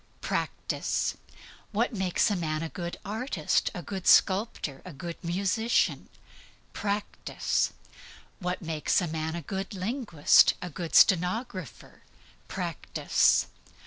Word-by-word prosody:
Practice. -, -, -2 dB, 0.6 s
What 230 Hz, +4 st, 0 dB
makes 190 Hz, +1 st, +1 dB
a -, -, +1 dB
man 155 Hz, -3 st, -2 dB
a 165 Hz, -, -4 dB
good 175 Hz, 0 st, -5 dB
artist, 210 Hz, -, 0 dB
a 175 Hz, -, -5 dB
good 190 Hz, -2 st, -5 dB
sculptor, 190 Hz, -, +3 dB
a 185 Hz, -, -9 dB
good 170 Hz, +4 st, -7 dB
musician? 195 Hz, +7 st, 0 dB, 0.6 s
Practice. 205 Hz, 0 st, -1 dB, 0.7 s
What 180 Hz, -1 st, -3 dB
makes 160 Hz, -2 st, +1 dB
a 180 Hz, -, -1 dB
man 160 Hz, 0 st, -3 dB
a 170 Hz, -, -5 dB
good 195 Hz, +6 st, -4 dB
linguist, 195 Hz, -, +4 dB
a 180 Hz, -1 st, -6 dB
good 170 Hz, +1 st, -5 dB
stenographer? 185 Hz, -, +2 dB, 0.5 s
Practice. -, -, +1 dB
180 Hz, 115 wpm, -28 LUFS, 165-205 Hz, 0.7 s, linguist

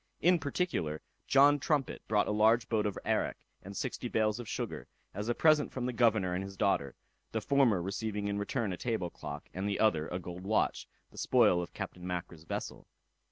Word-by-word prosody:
In 180 Hz, 0 st, +4 dB
particular, 140 Hz, -, -2 dB, 0.2 s
John 145 Hz, +1 st, +6 dB
Trumpet 140 Hz, -2 st, 0 dB
brought 105 Hz, -1 st, +2 dB
a -, -, 0 dB
large 110 Hz, +2 st, +4 dB
boat 110 Hz, -2 st, +1 dB
of 100 Hz, -, -4 dB
arrack, -, -, 0 dB, 0.2 s
and 100 Hz, +1 st, -8 dB
sixty 125 Hz, -1 st, -3 dB
bales 110 Hz, -1 st, +1 dB
of 120 Hz, -, -7 dB
sugar, -, -, -4 dB, 0.3 s
as 105 Hz, +4 st, -4 dB
a 120 Hz, -, +1 dB
present 155 Hz, -2 st, +4 dB
from 130 Hz, -2 st, -3 dB
the 125 Hz, -, -2 dB
governor 110 Hz, -6 st, +3 dB
and 90 Hz, +2 st, -1 dB
his 95 Hz, 0 st, -9 dB
daughter; 70 Hz, -9 st, +1 dB, 0.4 s
the 110 Hz, -, +1 dB
former 115 Hz, -6 st, +3 dB
receiving 100 Hz, +2 st, -3 dB
in 100 Hz, 0 st, -1 dB
return 105 Hz, -1 st, -1 dB
a -, -, -5 dB
table 110 Hz, -8 st, -2 dB
clock, -, -, -7 dB
and 95 Hz, +2 st, -2 dB
the 100 Hz, -, -1 dB
other 80 Hz, -8 st, +3 dB
a 90 Hz, -, -3 dB
gold 90 Hz, 0 st, -7 dB
watch, 105 Hz, +2 st, 0 dB, 0.2 s
the -, -, -10 dB
spoil 110 Hz, -8 st, +4 dB
of 85 Hz, -, -8 dB
Captain 90 Hz, 0 st, -6 dB
Mackra's 85 Hz, -2 st, -5 dB
vessel. -, -, -5 dB
105 Hz, 200 wpm, -32 LUFS, 90-120 Hz, 0.4 s, John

